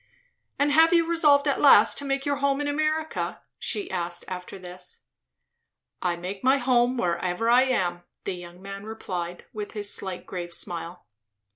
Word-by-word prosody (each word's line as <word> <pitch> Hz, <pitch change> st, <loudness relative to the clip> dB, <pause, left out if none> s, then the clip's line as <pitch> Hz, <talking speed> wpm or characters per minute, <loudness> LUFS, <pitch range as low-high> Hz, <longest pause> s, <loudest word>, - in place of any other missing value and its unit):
"And 285 Hz, +1 st, +2 dB
have 320 Hz, +3 st, +6 dB
you 335 Hz, -1 st, +4 dB
resolved 300 Hz, -4 st, +4 dB
at 280 Hz, -, +1 dB
last 285 Hz, -, +7 dB
to 285 Hz, -, -5 dB
make 275 Hz, 0 st, -1 dB
your 285 Hz, -1 st, 0 dB
home 280 Hz, 0 st, +1 dB
in 290 Hz, -, -1 dB
America?" 310 Hz, +2 st, -1 dB, 0.2 s
she 405 Hz, -, -1 dB
asked 175 Hz, -1 st, -3 dB
after 185 Hz, +1 st, -7 dB
this. 180 Hz, 0 st, -6 dB, 1.0 s
"I 175 Hz, -1 st, 0 dB
make 185 Hz, +3 st, -7 dB
my 265 Hz, +2 st, +5 dB
home 250 Hz, -1 st, +2 dB
wherever 180 Hz, +3 st, 0 dB
I 250 Hz, +2 st, +6 dB
am," 180 Hz, -9 st, 0 dB, 0.2 s
the 195 Hz, -, -3 dB
young 175 Hz, +1 st, -11 dB
man 195 Hz, 0 st, -7 dB
replied, 180 Hz, -5 st, -5 dB
with 210 Hz, -1 st, -6 dB
his 205 Hz, -2 st, +1 dB
slight 190 Hz, -2 st, -3 dB
grave 175 Hz, -2 st, -6 dB
smile. 170 Hz, +1 st, -5 dB
210 Hz, 165 wpm, -26 LUFS, 180-280 Hz, 1.0 s, last